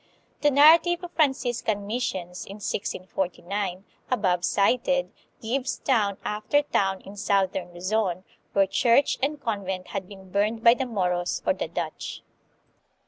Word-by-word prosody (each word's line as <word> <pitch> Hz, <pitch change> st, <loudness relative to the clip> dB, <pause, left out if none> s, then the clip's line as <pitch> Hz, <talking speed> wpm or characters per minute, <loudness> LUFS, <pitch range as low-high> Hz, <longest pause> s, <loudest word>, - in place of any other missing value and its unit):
The 295 Hz, -, +5 dB
narrative 330 Hz, +5 st, +6 dB
of 350 Hz, -, -7 dB
Franciscan 245 Hz, -9 st, 0 dB
missions 190 Hz, -6 st, -3 dB
in 195 Hz, -, -8 dB
1649, 190 Hz, -1 st, -3 dB, 0.2 s
above 185 Hz, -8 st, +1 dB
cited, 250 Hz, +8 st, +2 dB, 0.3 s
gives 255 Hz, +3 st, -2 dB
town 210 Hz, -7 st, +1 dB
after 215 Hz, +8 st, +1 dB
town 195 Hz, -8 st, 0 dB
in 195 Hz, -, -11 dB
southern 190 Hz, -2 st, 0 dB
Luzon, 185 Hz, 0 st, -1 dB, 0.3 s
where 195 Hz, 0 st, +4 dB
church 235 Hz, +7 st, +3 dB
and 290 Hz, +2 st, -1 dB
convent 190 Hz, -6 st, -3 dB
had 195 Hz, -2 st, -4 dB
been 190 Hz, -2 st, -13 dB
burned 215 Hz, +3 st, 0 dB
by 235 Hz, -, +8 dB
the 260 Hz, +1 st, -3 dB
Moros 180 Hz, -5 st, -1 dB
or -, -, +3 dB
the -, -, -4 dB
Dutch. -, -, -5 dB
205 Hz, 135 wpm, -26 LUFS, 190-255 Hz, 0.3 s, by